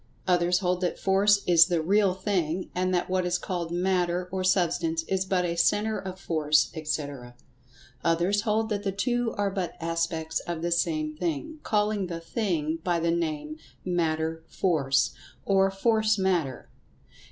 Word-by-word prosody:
Others 175 0 +3
hold 180 0 0
that 180 - -1
Force 200 +1 +3
is 170 -1 +6
the 175 -3 +1
"real 195 +3 +2
thing," 185 -3 -1
and 185 +1 0
that 180 -1 0
what 185 0 0
is 180 0 0
called 175 -2 -4
Matter, 180 0 0
or 190 0 -2
Substance, 170 -3 +1
is 190 +2 -1
but 185 -2 +1
a 170 -1 -1
centre 210 +5 +2
of 185 -1 -7
Force, 155 -4 +2
etc. 145 -6 -4 0.7
Others 175 +5 +2
hold 220 0 0
that 205 -2 -1
the 200 -1 -1
two 240 +4 0
are 200 -1 0
but 190 -3 -3
aspects 165 -1 -2
of 170 -2 -5
the 175 - -1
same 155 -3 0
thing, 175 - -3
calling 210 -2 0
the 170 -1 -5
"thing" 165 -4 -2
by 175 -2 +1
the 165 0 +1
name 155 -2 -2 0.3
"Matter 160 -2 -1
Force," 140 -7 +1 0.3
or 195 -1 +3
"Force 215 +2 +2
Matter." 180 -8 -1
180 Hz, 160 wpm, -27 LUFS, 165-195 Hz, 0.7 s, is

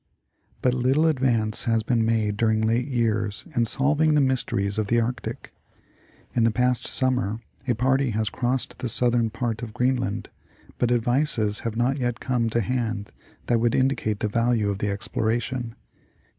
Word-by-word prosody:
But 125 - +3
little 130 +5 +2
advance 125 -8 +1
has 115 -1 +1
been 115 0 +1
made 110 -2 +1
during 110 0 +2
late 115 +3 +1
years 110 -5 -1
in 120 - +3
solving 150 +5 +2
the - - +4
mysteries 110 -7 0
of 105 - -1
the 120 +2 +2
Arctic. 120 +2 -4 0.8
In 120 - +2
the 115 - +5
past 125 +2 0
summer 125 -5 0 0.3
a 120 - +2
party 130 +3 +2
has 110 0 -1
crossed 125 +1 -2
the 125 - -3
southern 120 0 +2
part 115 0 -3
of 110 -3 -7
Greenland, 125 -5 -1 0.5
but 120 - +1
advices 120 -3 +1
have 115 -1 -4
not 130 +4 +1
yet 120 -2 -1
come 120 -3 0
to 115 +1 0
hand 115 -3 -2 0.3
that 120 -1 +2
would 120 0 +1
indicate 130 -6 0
the - - +1
value 115 -1 +1
of 100 - -4
the 105 - -1
exploration. 120 +3 -2
120 Hz, 165 wpm, -24 LUFS, 110-125 Hz, 0.8 s, the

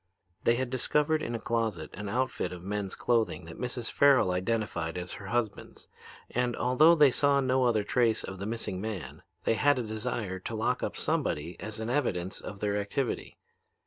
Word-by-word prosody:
"They 115 - +5
had 125 0 -2
discovered 150 +4 +1
in 120 - -3
a - - -2
closet 110 -9 -1
an 105 +1 -5
outfit 130 +5 -1
of 90 -1 -8
men's 100 0 -3
clothing 110 -9 +1
that 85 - -10
Mrs. 125 -1 -3
Farrel 140 -9 +5
identified 90 -3 -1
as 90 0 -5
her 100 - -8
husband's, 110 -2 -3 0.4
and, 125 0 0
although 150 +7 +5
they 145 -4 +6
saw 140 +2 +3
no 130 -1 +2
other 110 -4 +2
trace 115 0 +2
of 95 -1 -7
the 100 - -4
missing 110 -5 -3
man, 105 -5 -5 0.2
they - - +3
had 145 +5 +3
a 125 - -1
desire 110 -3 -3
to 110 +5 -5
lock 110 - 0
up - - -3
somebody 80 +4 -1
as 110 +1 -6
an 110 +2 -2
evidence 95 -10 -1
of 100 -2 -8
their 105 -1 +1
activity. 120 +5 -3
110 Hz, 185 wpm, -29 LUFS, 100-125 Hz, 0.4 s, they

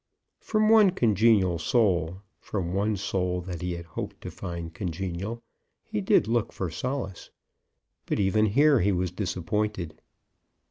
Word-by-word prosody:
From 215 -1 +1
one 215 -3 +7
congenial 110 - +3
soul, 95 -5 +1 0.2
from 90 -4 -3
one 105 +2 0
soul 90 -2 -1
that 90 -2 -6
he 90 0 -2
had 85 -1 -7
hoped 80 - -6
to - - -6
find 85 -1 -6
congenial, 95 +5 -4 0.4
he 105 - -3
did 100 - +3
look 115 -1 0
for 90 -4 -4
solace; 120 - -4 0.8
but - - -1
even 105 +2 +3
here 140 +5 +4
he 100 +3 +2
was 90 -1 -1
disappointed. 95 -1 -3
95 Hz, 140 wpm, -27 LUFS, 90-110 Hz, 0.8 s, one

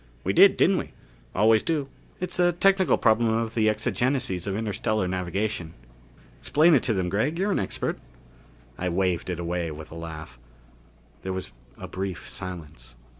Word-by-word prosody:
"We - - 0
did, - - +7
didn't - - +4
we? - - -7 0.4
Always 110 +2 +5
do 150 -4 -1 0.3
it's 180 0 -3
a 175 0 +5
technical 190 +2 +3
problem 115 0 +3
of 115 0 -1
the 110 -2 +3
exigencies 120 -3 -1
of 100 - -1
interstellar 110 -2 -1
navigation. 90 -1 -2 0.6
Explain 160 - +4
it 140 - +5
to 115 - +1
them, 95 -2 0
Gregg. 110 - 0
You're 195 +3 0
an - - +1
expert." 95 - -3 0.8
I 90 - -1
waved 90 0 0
it 90 -2 -3
away 85 0 -2
with 80 0 -9
a - - -9
laugh. 80 -5 -8 0.8
There 95 - -4
was 95 0 -5 0.3
a - - -7
brief 95 -2 -5
silence. 75 -10 -8
100 Hz, 165 wpm, -26 LUFS, 90-120 Hz, 0.8 s, did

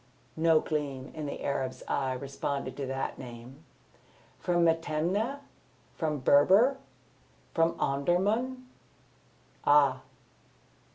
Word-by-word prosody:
No 160 0 +4
gleam 140 -4 -3
in 155 -2 -5
the - - -6
Arab's 135 -2 -2
eyes 130 -2 -1
responded 140 -1 -4
to 140 -2 -4
that 135 +1 -3
name. 125 +4 -10 0.8
"From 175 -1 +2
Metemneh? 165 - 0 0.6
From 155 -3 -1
Berber? 195 - +5 0.8
From 165 0 +2
Omdurman? 205 - 0 1.0
Ah!" 140 -3 +4
150 Hz, 95 wpm, -29 LUFS, 135-175 Hz, 1.0 s, Berber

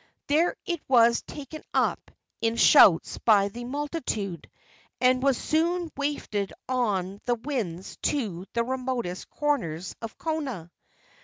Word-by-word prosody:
There 315 +4 +2
it 345 -3 -2
was 235 -2 +5
taken 295 +2 -9
up - - +1 0.3
in 225 0 +1
shouts 215 - +6
by 205 -3 +4
the 240 +4 -8
multitude, 250 - -4 0.5
and 255 0 +3
was 270 -2 +3
soon 335 +1 0
wafted 280 -9 -2 0.2
on 205 -6 -1
the 245 - +2
winds 225 - -4
to 200 - -2
the 235 - +1
remotest 255 -7 -3
corners 185 - -2
of 225 -1 -7
Kona. 270 - -4
245 Hz, 125 wpm, -27 LUFS, 200-290 Hz, 0.5 s, shouts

